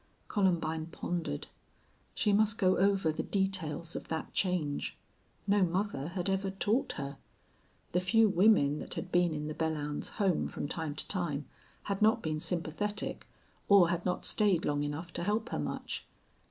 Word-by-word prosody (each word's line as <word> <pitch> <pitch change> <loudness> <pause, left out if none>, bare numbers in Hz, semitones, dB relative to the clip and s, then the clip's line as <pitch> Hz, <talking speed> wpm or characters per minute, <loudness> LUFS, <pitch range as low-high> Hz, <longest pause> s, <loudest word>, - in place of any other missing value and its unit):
Columbine 165 -5 +1
pondered. 170 - -3 0.7
She 205 - +2
must 215 +2 +3
go 185 -3 +4
over 195 -4 +3
the 155 - -3
details 185 -4 -1
of - - -5
that 160 -1 -4
change. 175 -7 -1 0.5
No 200 0 +3
mother 180 -4 0
had 180 +1 -3
ever 195 0 0
taught 205 +6 0
her. 140 -1 -6 0.7
The 180 - +2
few 220 +5 +4
women 180 -7 +4
that - - -6
had 185 - -5
been 175 -1 +3
in 150 -1 -3
the 155 - -3
Belllounds 150 -2 -2
home 195 -5 +1
from - - -4
time 155 -1 -3
to - - -3
time 150 -7 -2 0.4
had 200 0 -3
not 220 +2 +4
been 155 -1 -1
sympathetic 180 +6 -2 0.4
or 195 -4 +7
had 175 0 -1
not 180 -1 -1
stayed 200 -6 +3
long 145 0 +1
enough 150 +4 -4
to 170 - -3
help 215 +4 0
her - - -2
much. - - -4
175 Hz, 165 wpm, -32 LUFS, 155-200 Hz, 0.7 s, or